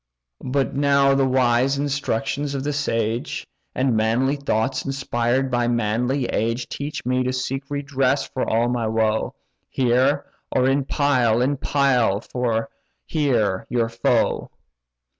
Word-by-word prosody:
But 135 +1 -1
now 140 -1 +4
the 135 -1 +2
wise 130 +1 +2
instructions 140 0 -2
of 135 - -3
the 145 +1 -1
sage, 115 -5 -2 0.3
And 130 -2 +1
manly 115 +6 +2
thoughts 130 -2 -1
inspired 130 -1 -1
by 120 -1 +1
manly 120 +3 0
age, 115 +2 -1
Teach 145 -2 -5
me 130 +1 +1
to 130 - -1
seek 130 +2 -3
redress 140 -1 0
for 130 - -3
all 115 +2 +2
my 120 -2 -1
woe, 110 0 0 0.3
Here, 130 +3 +2 0.3
or 130 0 +2
in 135 0 +1
Pyle—in 130 -2 +2
Pyle, 125 -8 +1
or 115 -3 -1 0.3
here, 120 - 0
your 115 -2 0
foe. 115 0 0
130 Hz, 130 wpm, -22 LUFS, 115-140 Hz, 0.3 s, now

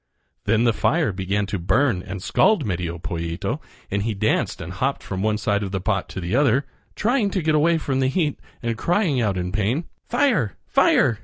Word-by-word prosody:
Then 110 +1 +3
the 120 -1 +3
fire 155 +1 +1
began 100 +2 -1
to 100 0 -3
burn 100 +3 +2
and 95 -1 -7
scald 190 - +3
Medio 85 -3 -2
Pollito, 85 0 -3 0.3
and 100 +1 0
he 110 +1 -1
danced 110 +2 0
and - - -6
hopped - - -1
from 95 - -4
one 105 +1 +1
side 100 -1 0
of 100 -2 -4
the 95 - -1
pot 100 0 -1
to - - -6
the 90 +5 -2
other, 140 -1 +3 0.3
trying 230 -1 +1
to 190 - -1
get 155 0 +2
away 165 +2 +4
from 135 -4 -1
the 130 - +2
heat 150 +1 0 0.2
and 115 -1 -1
crying 170 - +1
out 100 -4 0
in 90 0 -2
pain: 110 - 0 0.3
"Fire! 235 - +1
fire! 110 -2 +3
110 Hz, 205 wpm, -23 LUFS, 95-150 Hz, 0.3 s, away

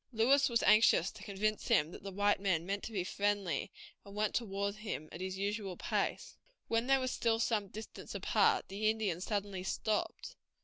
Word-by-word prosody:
Lewis 265 +5 +4
was 235 -1 +1
anxious 210 -4 +5
to - - -13
convince 210 +2 -2
him 150 +2 +3
that - - -10
the 200 - -6
white 205 +2 +2
men 185 -4 0
meant 200 +2 -2
to - - -6
be 195 -5 -1
friendly, 200 -1 -1 0.3
and 200 0 -12
went 210 -1 0
toward 200 -3 -1
him 210 -8 -5
at 170 - -8
his 190 0 -4
usual 200 -1 -3
pace. - - -2 0.3
When 230 +2 0
they 270 0 +5
were 260 - -1
still 230 -2 +1
some 220 -3 0
distance 215 +3 -9
apart - - +2
the 210 +3 0
Indian 210 -6 -1
suddenly 200 -2 -2
stopped. 210 +3 -2
205 Hz, 185 wpm, -34 LUFS, 195-220 Hz, 0.3 s, anxious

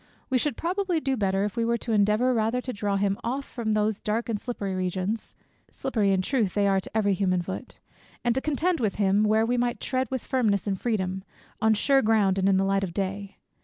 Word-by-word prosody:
We 255 - +3
should 290 -2 -1
probably 360 0 0
do 270 -3 -1
better, 195 -3 0
if 210 - -4
we 230 - 0
were 235 +1 +1
to 230 - -5
endeavour 215 +5 +3
rather 225 +2 +1
to 250 0 -5
draw 200 -1 -1
him 195 0 0
off 270 +4 -2
from 220 -3 -2
these 215 0 0
dark 225 +3 -1
and 210 -3 -2
slippery 205 -6 -4
regions, 185 +4 -3 0.3
(slippery 220 -7 -1
in 190 -1 +1
truth 220 -5 0
they 205 -1 +2
are 195 -1 +3
to 205 - -5
every 205 -2 +2
human 185 -2 +1
foot) 190 +8 -7 0.5
and 240 -1 +2
to 265 - -1
contend 320 +4 0
with 215 -4 0
him, 200 0 +2
where 215 +1 +3
we 245 +2 0
might 240 0 0
tread 260 -1 -1
with 260 -2 -4
firmness 220 -7 +1
and 195 -3 -2
freedom, 190 -5 -1 0.4
on 220 0 +4
sure 270 +6 +3
ground, 210 -4 +2
and 190 +1 +3
in 190 - +4
the 195 - +2
light 195 0 +1
of 175 -3 -4
day. 200 0 -3
215 Hz, 230 wpm, -26 LUFS, 195-245 Hz, 0.5 s, on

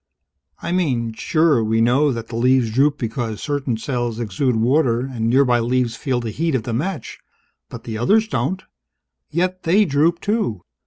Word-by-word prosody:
I - - -3
mean, 130 -11 0
sure, 155 0 +2
we 110 +1 +1
know 130 +6 +3
that 115 -2 -5
the 115 - -6
leaves 125 -1 +2
droop 140 +5 +2
because 115 -3 -3
certain 140 -5 -2
cells 120 -1 -3
exude 120 +3 -1
water 120 +1 +2
and 125 -4 -2
nearby 125 -1 +3
leaves 120 0 0
feel 130 -3 -1
the 115 -2 -4
heat 160 +5 -1
of 120 - -1
the 120 - -4
match. 160 +8 -4 0.5
But 115 - -9
the 110 -3 -5
others 215 - +3
don't, 145 - -2 0.7
yet 185 +2 -1
they 195 +6 +3
droop, 160 +2 +2
too. 205 - -1
130 Hz, 170 wpm, -20 LUFS, 115-155 Hz, 0.7 s, know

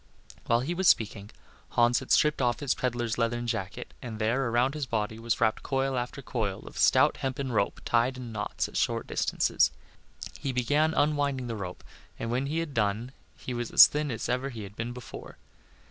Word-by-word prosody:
While 115 +1 +3
he 150 +7 -2
was 185 +1 +1
speaking 105 -5 +2 0.5
Hans 120 0 +5
had - - -10
stripped 150 -3 +3
off 120 -1 +1
his 140 -3 +1
peddler's 120 -2 -2
leathern 120 +1 0
jacket, 110 -5 -4
and 115 -4 -6
there, 115 +4 +1
around 120 +4 +2
his 150 -3 -3
body, 110 -1 -2
was 115 0 -1
wrapped 110 -1 +2
coil 135 -1 -1
after 125 +2 -4
coil 105 -7 -2
of - - -11
stout - - +4
hempen 135 0 -3
rope 105 -3 0
tied 120 +2 +2
in 125 -2 -7
knots 105 -1 -2
at - - -6
short - - 0
distances. - - +1 0.7
He 135 - -2
began 145 +6 +2
unwinding 145 -3 +1
the 115 -1 -4
rope, 90 -4 -6 0.3
and 115 - -4
when 130 +3 0
he 155 +3 -2
had 165 -3 -2
done 110 +2 0 0.3
he 125 - -6
was 120 -1 -3
as - - +10
thin 150 0 -1
as 115 - -3
ever 125 +2 -1
he 115 -5 -7
had 100 +1 -10
been 115 +2 -4
before. 125 -1 -10
120 Hz, 195 wpm, -28 LUFS, 115-135 Hz, 0.7 s, as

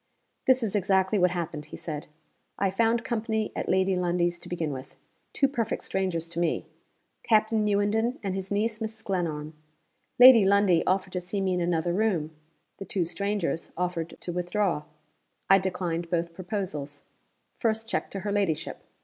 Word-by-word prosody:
"This 260 -1 +5
is 215 -2 -1
exactly 190 +1 +2
what 180 0 +5
happened," 165 -4 -4
he 150 - -9
said. 150 -3 -5 0.5
"I 195 -1 +1
found 230 +4 +1
company 220 -2 -1
at - - -3
Lady 190 0 +3
Lundie's, 175 -1 0
to - - -9
begin 165 -4 -2
with. 130 0 -9 0.4
Two 275 - +3
perfect 240 -5 -2
strangers 180 -4 -1
to 170 0 -4
me. 170 -2 0 0.6
Captain 220 0 +3
Newenden, 210 +4 +1
and 195 -2 -1
his 190 0 -4
niece, 215 +2 0
Mrs. 220 -1 -5
Glenarm. 160 -5 -2 0.6
Lady 245 -3 +10
Lundie 195 -3 +4
offered 185 0 +1
to 180 - -1
see 180 +3 -3
me 190 -1 +1
in 180 - 0
another 170 0 0
room; 180 -7 0 0.5
the 195 - -6
two 180 -1 0
strangers 200 -2 -2
offered 175 -2 -3
to 175 - -4
withdraw. 180 -2 0 0.7
I 195 - +8
declined 180 -3 -2
both 170 -1 -1
proposals. 170 -7 -5 0.6
First 225 -1 0
check - - -2
to 195 - -5
her 205 +1 -2
ladyship! 190 -7 -1
190 Hz, 165 wpm, -27 LUFS, 170-210 Hz, 0.7 s, Lady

